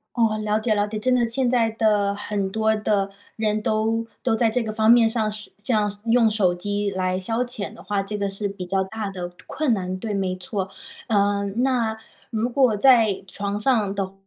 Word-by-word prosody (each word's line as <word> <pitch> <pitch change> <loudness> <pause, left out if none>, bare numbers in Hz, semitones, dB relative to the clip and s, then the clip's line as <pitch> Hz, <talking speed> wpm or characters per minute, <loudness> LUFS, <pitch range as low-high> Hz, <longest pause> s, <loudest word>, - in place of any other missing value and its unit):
哦， 225 -3 +2
了 215 0 0
解 220 0 +1
了 205 0 +1
解。 215 0 -4
真 255 +4 +2
的 240 -2 +3
现 245 +2 +1
在 235 -2 +2
的 210 -2 +2
很 200 -1 -3
多 220 +1 +1
的 205 -2 0 0.3
人 215 -1 0
都 220 +1 0 0.2
都 255 - +2
在 225 0 +2
这 240 +2 0
个 220 - -4
方 220 +1 +3
面 235 -1 +6
上 220 -2 0 0.3
这 250 - -1
样 210 -2 +2 0.2
用 230 0 +4
手 210 -4 +2
机 205 +3 -2
来 185 -1 -1
消 225 +6 -1
遣 240 -5 -4
的 225 - -13
话 200 -1 -1
这 205 +1 -4
个 200 - -1
是 200 +1 -3
比 195 -2 -7
较 190 +1 +1
大 210 +2 -4
的 180 -2 -5 0.2
困 300 -5 0
难。 185 -3 -2
对， 215 0 -3
没 190 -2 -1
错。 190 +1 -4 0.4
嗯， 200 +1 +1
那 240 -4 +1 0.3
如 225 +1 -1
果 250 -4 +3
在 220 -5 +4
床 200 +1 -3
上 210 -3 +1
的 195 -1 -3
215 Hz, 220 characters per minute, -23 LUFS, 200-225 Hz, 0.4 s, 面